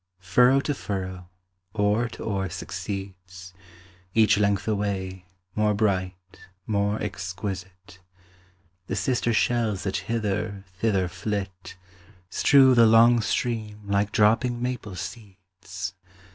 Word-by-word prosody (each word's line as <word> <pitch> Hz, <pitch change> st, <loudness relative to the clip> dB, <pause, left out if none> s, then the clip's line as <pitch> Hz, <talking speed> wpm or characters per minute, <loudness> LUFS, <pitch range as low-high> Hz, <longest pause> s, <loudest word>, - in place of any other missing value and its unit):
Furrow 125 Hz, +9 st, +4 dB
to 145 Hz, -, -1 dB
furrow, 95 Hz, -6 st, -5 dB, 0.5 s
oar 105 Hz, +3 st, +1 dB
to -, -, -9 dB
oar 95 Hz, -3 st, -2 dB
succeeds, 95 Hz, -1 st, -7 dB, 0.6 s
Each 110 Hz, -2 st, +5 dB
length 100 Hz, -1 st, +1 dB
away, 95 Hz, -3 st, -2 dB, 0.3 s
more 105 Hz, -1 st, +1 dB
bright, 95 Hz, -3 st, -2 dB, 0.3 s
more 105 Hz, 0 st, 0 dB
exquisite; 95 Hz, -1 st, -6 dB, 0.9 s
The 95 Hz, -, -2 dB
sister 120 Hz, +2 st, 0 dB
shells 110 Hz, -4 st, +1 dB
that 95 Hz, -1 st, -1 dB
hither, 105 Hz, 0 st, -2 dB, 0.2 s
thither 100 Hz, -5 st, +1 dB
flit, 95 Hz, -1 st, -5 dB, 0.5 s
Strew 135 Hz, +1 st, +6 dB
the 115 Hz, -2 st, +6 dB
long 115 Hz, +1 st, +6 dB
stream 110 Hz, -2 st, -2 dB
like 100 Hz, +1 st, 0 dB
dropping 115 Hz, +3 st, +3 dB
maple 125 Hz, -5 st, -4 dB
seeds. 95 Hz, -1 st, -8 dB
100 Hz, 105 wpm, -25 LUFS, 95-110 Hz, 0.9 s, Strew